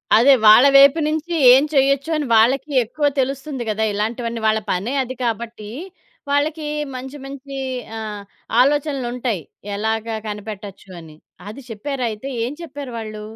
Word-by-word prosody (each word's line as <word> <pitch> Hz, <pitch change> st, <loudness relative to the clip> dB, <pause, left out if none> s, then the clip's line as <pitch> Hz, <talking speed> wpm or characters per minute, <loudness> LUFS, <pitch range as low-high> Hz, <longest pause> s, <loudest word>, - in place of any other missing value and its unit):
అదే. 255 Hz, +5 st, +7 dB
వాళ్ళ 215 Hz, +5 st, +8 dB
వైపు 280 Hz, +3 st, +7 dB
నుంచి 315 Hz, +2 st, -3 dB, 0.2 s
ఏం 265 Hz, +2 st, +5 dB
చేయొచ్చు 275 Hz, +2 st, +2 dB
అని 300 Hz, -, -2 dB
వాళ్ళకి 260 Hz, +6 st, +3 dB
ఎక్కువ 290 Hz, +6 st, -3 dB
తెలుస్తుంది 270 Hz, 0 st, -2 dB
గదా! 215 Hz, +1 st, -1 dB
ఇలాంటివన్నీ 230 Hz, +2 st, -3 dB
వాళ్ళ 220 Hz, 0 st, +2 dB
పనే 205 Hz, +9 st, -2 dB
అది 255 Hz, +1 st, -7 dB
కాబట్టి, 225 Hz, -2 st, -4 dB, 0.6 s
వాళ్ళకి 300 Hz, +2 st, 0 dB, 0.3 s
మంచి 265 Hz, +3 st, -7 dB
మంచి 275 Hz, 0 st, -8 dB, 0.4 s
ఆహ్, 210 Hz, -2 st, -6 dB, 0.4 s
ఆలోచనలుంటాయి 255 Hz, -, 0 dB, 0.3 s
ఎలాగా 220 Hz, +2 st, -2 dB
కనిపెట్టొచ్చు 205 Hz, -2 st, -8 dB
అని. 155 Hz, -2 st, -14 dB, 0.3 s
అది 275 Hz, +6 st, -9 dB
చెప్పారైతే 235 Hz, 0 st, -4 dB, 0.2 s
ఏం 250 Hz, -, -4 dB
చెప్పారు 285 Hz, -4 st, -8 dB
వాళ్ళు? 215 Hz, -1 st, -7 dB
250 Hz, 130 wpm, -20 LUFS, 220-275 Hz, 0.6 s, వాళ్ళ